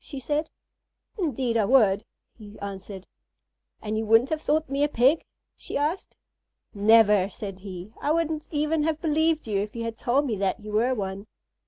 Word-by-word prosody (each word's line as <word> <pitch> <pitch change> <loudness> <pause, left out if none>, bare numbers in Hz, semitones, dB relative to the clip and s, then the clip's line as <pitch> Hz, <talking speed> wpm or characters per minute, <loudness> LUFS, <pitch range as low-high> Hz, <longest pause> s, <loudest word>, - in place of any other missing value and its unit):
she 280 - -7
said. 300 +4 -2 0.7
"Indeed 260 - 0
I 215 - +2
would," 210 -5 +4 0.3
he 210 -2 -13
answered. 195 -1 -7 0.8
"And 215 0 -2
you - - -1
wouldn't 225 +5 +4
have 310 -1 -1
thought 310 +2 +1
me 275 +1 0
a - - +4
Pig?" 270 +5 +3 0.3
she - - -5
asked. 305 +7 -2 0.6
"Never!" 210 -2 +5
said 195 -1 -7
he; 190 +1 -9
"I - - -1
wouldn't 320 -1 -1
even 305 +1 0
have 310 0 0
believed 315 -2 +1
you 205 -2 0
if 210 +2 -4
you 230 - -3
had 230 -1 -5
told 270 +4 +1
me 235 -6 -1
that 195 +2 -1
you 210 0 -9
were 235 +5 +2
one." 195 -1 -5
230 Hz, 180 wpm, -26 LUFS, 205-295 Hz, 0.8 s, Never